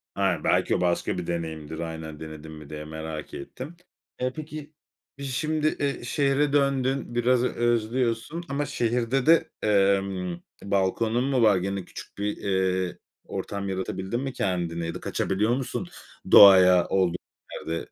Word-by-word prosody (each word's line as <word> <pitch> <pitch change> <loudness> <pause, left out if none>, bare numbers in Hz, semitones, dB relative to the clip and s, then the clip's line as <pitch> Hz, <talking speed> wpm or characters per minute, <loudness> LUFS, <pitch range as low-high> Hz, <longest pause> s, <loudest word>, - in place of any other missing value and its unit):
Aynen, 90 -6 0
belki - - +2
o - - -1
başka 90 +1 0
bir 90 - -4
deneyimdir. 80 -2 -4
Aynen, 80 -2 -6
denedin 80 0 -9
mi 75 -2 -11
diye 75 0 -7
merak 80 -1 -7
ettim. 130 - -8 0.4
Eee, 125 0 -1
peki 155 -1 -8 0.4
biz 140 -1 -5
şimdi, 155 +2 0
ııı, 140 -4 -1
şehre 140 +2 +1
döndün 135 -3 +1
biraz 125 +1 +3
özlüyorsun. 120 +6 0
Ama 145 +1 -1
şehirde 120 +2 0
de, 165 +2 +5 0.2
emm, 95 -3 +1 0.2
balkonun 100 +5 +1
mu 135 -3 +1
var? 105 -4 +5
Gene 95 0 -3
küçük - - -11
bir, 105 +1 -2
eee, 95 -2 0 0.3
ortam 100 -1 -4
yaratabildin 95 +3 -3
mi 135 -1 -4
kendine 85 -5 -2
ya 85 - -3
da - - -5
kaçabiliyor 105 +5 0
musun 120 -7 -4 0.4
doğaya 90 -3 +8
olduğun 90 -2 +1 0.4
yerde? 85 0 -5
100 Hz, 145 wpm, -26 LUFS, 90-130 Hz, 0.4 s, doğaya